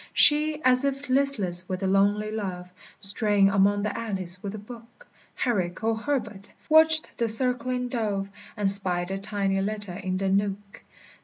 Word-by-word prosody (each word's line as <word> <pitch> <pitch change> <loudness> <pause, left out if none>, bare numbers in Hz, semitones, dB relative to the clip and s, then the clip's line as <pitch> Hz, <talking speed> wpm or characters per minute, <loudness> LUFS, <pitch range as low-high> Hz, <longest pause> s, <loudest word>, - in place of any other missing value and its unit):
She, 300 0 +4
as 255 0 +4
if 275 0 -3
listless 210 -10 +1
with 185 0 -5
a - - 0
lonely 205 +2 0
love, 180 -4 -6 0.3
Straying 200 0 +1
among 200 +1 +1
the 210 - -3
alleys 190 -5 -4
with 200 +1 -7
a - - -7
book, 235 - -14 0.3
Herrick 185 -7 -3
or 225 0 0
Herbert, 220 -5 -5 0.2
watched 315 0 +5
the 235 - 0
circling 250 +2 +2
dove, 210 -5 -3 0.3
And 200 -2 +3
spied 180 -3 +1
the 195 0 -4
tiny 195 -1 -2
letter 205 -2 -2
in 185 0 -5
the 195 0 -2
nook. 200 +1 -3
205 Hz, 160 wpm, -24 LUFS, 195-245 Hz, 0.3 s, watched